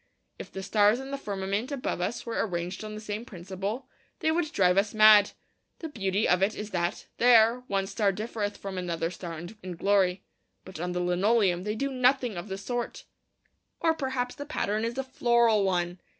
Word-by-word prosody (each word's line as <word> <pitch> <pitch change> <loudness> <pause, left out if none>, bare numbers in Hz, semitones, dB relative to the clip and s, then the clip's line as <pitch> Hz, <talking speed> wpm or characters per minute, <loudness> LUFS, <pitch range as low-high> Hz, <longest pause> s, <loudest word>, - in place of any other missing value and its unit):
If - - -8
the 190 - -6
stars 210 +3 +3
in 270 +1 -7
the - - -1
firmament 200 +4 -3
above 280 - -3
us 215 - -3
were 230 -1 -1
arranged 180 0 -4
on 215 0 -6
the - - -6
same 215 +1 -5
principle, 195 +4 -5 0.3
they 315 - +1
would 320 -2 0
drive 180 -2 +3
us 205 +2 +1
mad. 215 -1 +7 0.4
The 325 - -6
beauty 200 -5 0
of 180 +1 +3
it 200 +2 +2
is 210 0 -6
that, 175 -1 -2
there, 235 0 +6
one 195 -1 0
star 200 0 +1
differeth 210 0 -4
from 195 -2 -5
another 170 -2 -2
star 170 -3 -7 0.2
in 180 -1 -6
glory. 190 0 +2 0.4
But 185 -4 -9
on 180 +1 -3
the 180 - -1
linoleum 185 +1 +2
they 210 0 -2
do 275 +3 -2
nothing 255 -3 +2
of 175 +4 -6
the 190 - -4
sort. 240 +4 -4 0.7
Or 325 -1 +3
perhaps 260 -4 -2
the 285 0 -8
pattern 215 -6 -1
is 235 +2 -4
a 270 - -1
floral 235 -4 +3
one. 175 -1 0
205 Hz, 195 wpm, -28 LUFS, 185-240 Hz, 0.7 s, mad